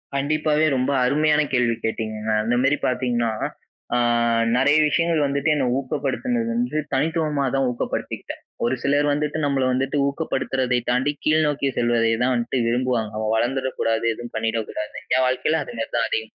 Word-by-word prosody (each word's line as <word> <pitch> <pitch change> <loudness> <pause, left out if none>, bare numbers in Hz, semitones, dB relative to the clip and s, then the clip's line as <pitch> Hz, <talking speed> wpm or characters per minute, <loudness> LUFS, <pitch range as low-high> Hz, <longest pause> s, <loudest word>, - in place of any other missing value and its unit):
கண்டிப்பாவே 150 +2 +1
ரொம்ப 130 +2 0
அருமையான 150 +3 +3
கேள்வி 120 -2 +2
கேட்டீங்கங்க. 110 -1 -3
அந்த 120 +2 +1
மாதிரி 140 +2 +3
பார்த்தீங்கன்னா, 120 -3 0 0.6
அ - - +3 0.6
நிறைய 145 +4 +4
விஷயங்கள் 165 -1 +1
வந்துட்டு 140 +2 0
என்ன 135 - 0
ஊக்கப்படுத்துனது 150 - -2
வந்து 240 -9 -1 0.2
தனித்துவமா 150 0 0
தான் 135 -1 +2
ஊக்கப்படுத்திக்கிட்டேன். 120 - -4 0.2
ஒரு 120 +2 +1
சிலர் 145 +1 +2
வந்துட்டு 150 +1 -1
நம்பள 140 -2 +1
வந்துட்டு 135 +3 0
ஊக்கப்படுத்துறதை 130 -4 -1
தாண்டி, 130 +4 +2
கீழ் 155 0 +3
நோக்கி 140 -1 0
செல்வதை 120 -1 +2
தான் 130 - +2
வன்ட்டு 120 +2 -1
விரும்புவாங்க. 120 -3 0
அவன் 110 0 0
வளர்ந்துற 130 +4 0
கூடாது, 115 0 0
எதுவும் 120 +2 -9
பண்ணிடக்கூடாதுன்னு. 110 -1 -3
என் 130 0 +3
வாழ்க்கைல 150 +5 0
அது - - -9
மாதிரி 115 - -3
தான் 115 - +1
அதிகமா 110 0 -4
130 Hz, 155 wpm, -22 LUFS, 120-150 Hz, 0.6 s, நிறைய